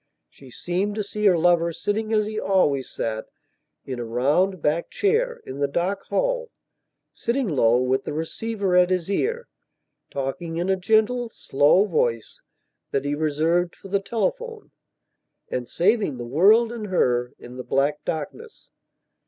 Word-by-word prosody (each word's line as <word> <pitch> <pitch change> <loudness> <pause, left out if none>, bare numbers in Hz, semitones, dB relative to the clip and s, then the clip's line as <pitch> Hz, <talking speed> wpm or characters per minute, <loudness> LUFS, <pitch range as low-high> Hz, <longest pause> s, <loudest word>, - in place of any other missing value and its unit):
She 135 - -16
seemed 180 - -2
to 215 - -1
see 210 +1 0
her 180 -3 +5
lover 170 0 +3
sitting 215 +6 -2
as 215 -1 +2
he 215 0 -3
always 145 - +1
sat, 110 -1 -4 0.6
in 130 -2 -5
a - - -3
round 145 +11 +1
backed 155 +3 0
chair, 465 +4 0
in 135 +2 -7
the 140 - +2
dark 180 +7 -2
hallsitting 475 - -3
low, 120 -8 +3
with 130 +1 0
the - - -3
receiver 190 +5 -2
at 180 0 +5
his 185 0 -1
ear, 470 - -1 0.6
talking 150 +5 -4
in 180 +3 0
a - - +3
gentle, 220 +5 +1
slow 150 +1 +3
voice, 120 - -1 0.5
that 135 0 -1
he 145 - 0
reserved 160 +4 0
for 195 - -13
the 200 +1 +1
telephoneand 420 - -3 1.0
saving 195 - +1
the 120 - -6
world 205 - +4
and 225 -3 -5
her, 125 -10 +1
in 125 +1 -11
the 125 - -5
black 145 +3 0
darkness. 430 - -6
180 Hz, 150 wpm, -24 LUFS, 140-215 Hz, 1.0 s, her